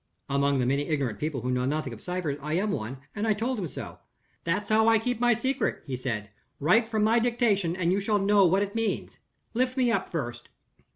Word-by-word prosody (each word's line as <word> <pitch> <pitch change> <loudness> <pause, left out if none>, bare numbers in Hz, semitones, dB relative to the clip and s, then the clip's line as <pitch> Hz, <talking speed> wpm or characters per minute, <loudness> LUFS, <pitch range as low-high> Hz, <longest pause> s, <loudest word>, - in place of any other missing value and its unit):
Among 140 0 +2
the 125 - +1
many 140 +3 +1
ignorant 135 -9 -1
people 150 -4 -2
who 125 - -1
know 125 0 0
nothing 145 -3 -2
of 110 - -10
ciphers, 180 -6 -3
I 150 +2 -3
am 205 +4 +1
one 120 - -3 0.2
and 210 +1 -1
I 215 - +3
told 235 +3 -1
him 180 - -2
so. - - -8 0.4
'That's 185 +5 -1
how 220 +1 +4
I 225 0 +6
keep 240 +1 -2
my 240 0 +4
secret,' 260 +4 -1
he 135 - -3
said; 110 -5 -4 0.3
'write 220 +10 +3
from 220 -2 +1
my 225 +2 +4
dictation, 225 -7 +1
and 175 -1 +1
you 195 - +1
shall 210 +1 +1
know 200 0 +4
what 190 +4 +3
it 200 0 -5
means. 225 -1 -2 0.3
Lift 255 +2 0
me 250 -2 +3
up - - 0
first. 120 -8 -5
190 Hz, 225 wpm, -27 LUFS, 140-225 Hz, 0.4 s, I